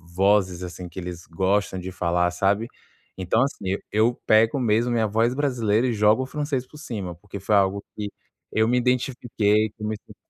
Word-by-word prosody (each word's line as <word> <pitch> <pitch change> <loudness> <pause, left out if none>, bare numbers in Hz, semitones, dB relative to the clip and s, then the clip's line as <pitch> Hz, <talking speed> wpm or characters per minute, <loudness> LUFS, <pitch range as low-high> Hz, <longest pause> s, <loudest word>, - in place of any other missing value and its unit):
vozes, 95 -2 +2
assim, 90 0 -7
que 85 - -8
eles 90 -1 -7
gostam 95 +2 0
de 90 +1 -6
falar, 90 0 +1
sabe. 100 +5 +1 0.5
Então 95 +6 +2
assim, 120 -8 -3
eu 100 - -1
eu 110 +3 +3
pego 110 +5 +4
mesmo 120 0 +2
minha 115 -2 +2
voz 115 +3 +1
brasileira, 125 -5 +1
e 120 - 0
jogo 105 +3 +3
o - - -4
francês 145 -2 -2
por 150 - -15
cima, 105 - -5
porque 100 +3 -9
foi 105 +3 +1
algo 100 0 +2
que 105 -1 -3 0.4
eu 110 0 +2
me 125 - +3
identifiquei 120 -4 +1
com 105 0 -3
isso 105 - -11
105 Hz, 185 wpm, -24 LUFS, 95-120 Hz, 0.5 s, pego